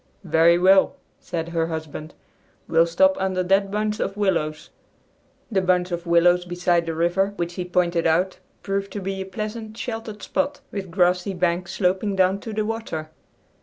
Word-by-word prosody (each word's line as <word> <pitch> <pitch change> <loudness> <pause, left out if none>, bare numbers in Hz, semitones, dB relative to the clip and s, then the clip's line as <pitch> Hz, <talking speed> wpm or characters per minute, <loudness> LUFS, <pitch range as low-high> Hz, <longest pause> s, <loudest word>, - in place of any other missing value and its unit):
"Very 170 0 +4
well," 190 +2 +5 0.2
said 165 -1 -4
her 165 -1 0
husband; 160 -1 -6 0.5
"we'll 165 +1 +4
stop 285 +12 +4
under 190 -1 0
that 195 +2 +2
bunch 210 +1 -1
of 195 - -2
willows." 165 -7 -1 0.8
The 195 -3 +2
bunch 180 -1 +1
of 175 0 -4
willows 175 +1 +4
beside 175 -1 0
the 165 - -2
river 175 +4 +1
which 170 -2 -3
he 180 0 -4
pointed 175 -2 +1
out 180 +4 +1 0.2
proved 195 0 -2
to 205 - -3
be 195 0 -4
a - - -4
pleasant, 215 +2 -6
sheltered 225 -3 -5
spot, 285 0 -1
with 195 -2 -5
grassy 180 +1 +1
banks 175 0 -1
sloping 190 +2 0
down 190 +1 +3
to 225 - -7
the 215 0 -1
water. 210 -9 -4
185 Hz, 165 wpm, -23 LUFS, 170-200 Hz, 0.8 s, well